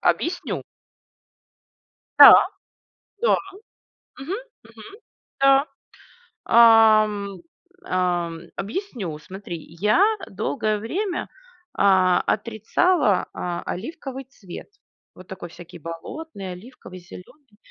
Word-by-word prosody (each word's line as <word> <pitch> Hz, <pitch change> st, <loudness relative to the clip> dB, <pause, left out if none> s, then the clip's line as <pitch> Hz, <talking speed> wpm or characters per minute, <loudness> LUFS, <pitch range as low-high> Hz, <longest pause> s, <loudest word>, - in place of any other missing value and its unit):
Объясню. 350 Hz, +2 st, -1 dB, 1.6 s
Да. -, -, +12 dB, 0.9 s
Да! 480 Hz, -, +3 dB, 0.8 s
Мгм, 275 Hz, +7 st, -6 dB, 0.3 s
мгм. 405 Hz, +3 st, -14 dB, 0.4 s
Да. 275 Hz, +1 st, +5 dB, 0.8 s
А, 225 Hz, -2 st, +7 dB
м, 200 Hz, -2 st, -6 dB, 0.5 s
а, 180 Hz, -2 st, 0 dB
м, 165 Hz, 0 st, -8 dB, 0.2 s
объясню, 210 Hz, -, -5 dB
смотри. 185 Hz, +1 st, -8 dB, 0.2 s
Я 210 Hz, -, +3 dB, 0.3 s
долгое 215 Hz, -5 st, -2 dB
время, 355 Hz, -, -3 dB, 0.5 s
а, 185 Hz, -2 st, +3 dB
отрицала, 220 Hz, -, +1 dB
а, 175 Hz, -1 st, -4 dB
оливковый 270 Hz, -, -6 dB
цвет. 200 Hz, -9 st, -11 dB, 0.5 s
Вот 185 Hz, -, -14 dB
такой 185 Hz, -2 st, -8 dB
всякий 170 Hz, 0 st, -13 dB
болотный, 190 Hz, -, -8 dB
оливковый, 185 Hz, -1 st, -12 dB
зеленый. 215 Hz, -, -15 dB
215 Hz, 90 wpm, -23 LUFS, 185-270 Hz, 1.6 s, Да